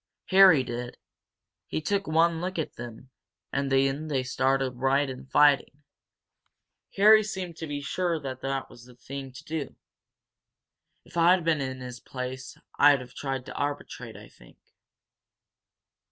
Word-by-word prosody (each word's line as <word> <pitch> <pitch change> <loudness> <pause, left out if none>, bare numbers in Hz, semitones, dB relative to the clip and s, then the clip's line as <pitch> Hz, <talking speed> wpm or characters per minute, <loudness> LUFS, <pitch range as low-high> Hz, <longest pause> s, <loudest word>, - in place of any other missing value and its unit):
"Harry 185 -7 +7
did. 120 0 -6 0.7
He - - -2
took 195 +5 -1
one 165 +1 +2
look 185 +1 -4
at 160 - -3
him 120 +2 -10 0.4
and 140 -1 -1
then 135 +3 +1
they 135 -4 -1
started 130 0 0
right 135 +2 +2
in 130 0 -8
fighting. 145 0 +3 1.1
Harry 215 +2 +7
seemed 190 -5 -5
to 160 - -6
be 145 -1 -4
sure 170 +3 -1
that 135 -1 -4
was 120 - -15
the 125 -1 -16
thing 135 +2 -8
to 130 +4 -12
do. 155 -3 -5 1.3
If - - -11
I'd 175 +1 +5
been 160 -3 +2
in 130 -1 -4
his 125 -1 -8
place 130 +1 -7 0.2
I'd 145 -2 +6
have 125 0 -12
tried 135 -2 -4
to - - -8
arbitrate 145 0 -5
I - - -12
think. - - -20
140 Hz, 145 wpm, -27 LUFS, 130-160 Hz, 1.3 s, Harry